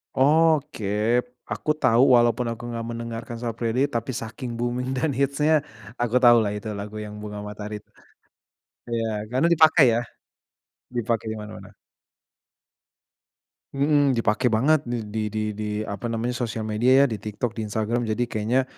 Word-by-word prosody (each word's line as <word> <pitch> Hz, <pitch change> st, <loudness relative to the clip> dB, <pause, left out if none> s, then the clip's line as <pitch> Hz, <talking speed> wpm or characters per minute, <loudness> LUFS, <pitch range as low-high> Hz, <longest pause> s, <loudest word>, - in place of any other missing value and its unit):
Oke, 150 Hz, -4 st, +3 dB, 0.7 s
aku 155 Hz, -, -1 dB
tahu, 125 Hz, -2 st, +4 dB
walaupun 120 Hz, +1 st, +3 dB
aku 115 Hz, +1 st, -7 dB
nggak 115 Hz, -1 st, -4 dB
mendengarkan 115 Hz, 0 st, -6 dB
Sal 115 Hz, -2 st, -2 dB
Priadi, 120 Hz, +2 st, 0 dB
tapi 115 Hz, +3 st, -1 dB
saking 120 Hz, +2 st, -6 dB
booming 120 Hz, +2 st, -2 dB
dan 150 Hz, +4 st, 0 dB
hits-nya 140 Hz, +3 st, +2 dB, 0.5 s
aku 120 Hz, 0 st, 0 dB
tahu 120 Hz, 0 st, +8 dB
lah 100 Hz, -, -1 dB
itu 105 Hz, +1 st, -6 dB
lagu 105 Hz, +1 st, -7 dB
yang 105 Hz, -, -9 dB
Bunga 105 Hz, -1 st, -6 dB
Matahari 105 Hz, 0 st, -6 dB
t -, -, -50 dB, 1.0 s
iya 115 Hz, -1 st, -1 dB, 0.2 s
karena 130 Hz, +6 st, +2 dB
dipakai 160 Hz, -2 st, +6 dB
ya? 115 Hz, -, +1 dB, 1.0 s
Dipake 115 Hz, -1 st, -1 dB
di 110 Hz, -, -4 dB
mana-mana. 105 Hz, 0 st, -10 dB, 2.0 s
Mhm, 140 Hz, -1 st, +3 dB
dipake 115 Hz, +2 st, +1 dB
banget 130 Hz, +8 st, +3 dB
di 110 Hz, -2 st, -3 dB
di 110 Hz, 0 st, -2 dB
di 105 Hz, 0 st, -5 dB
apa 100 Hz, +2 st, -5 dB
namanya, 115 Hz, +1 st, -2 dB
sosial 115 Hz, -2 st, -3 dB
media, 120 Hz, +6 st, +4 dB
ya. -, -, +5 dB
Di 110 Hz, -, -3 dB
TikTok, 105 Hz, +3 st, -3 dB
di 110 Hz, -1 st, -3 dB
Instagram. 110 Hz, +3 st, -1 dB
Jadi 110 Hz, +3 st, 0 dB
kayaknya 115 Hz, +5 st, +1 dB
115 Hz, 150 wpm, -24 LUFS, 110-130 Hz, 2.0 s, tahu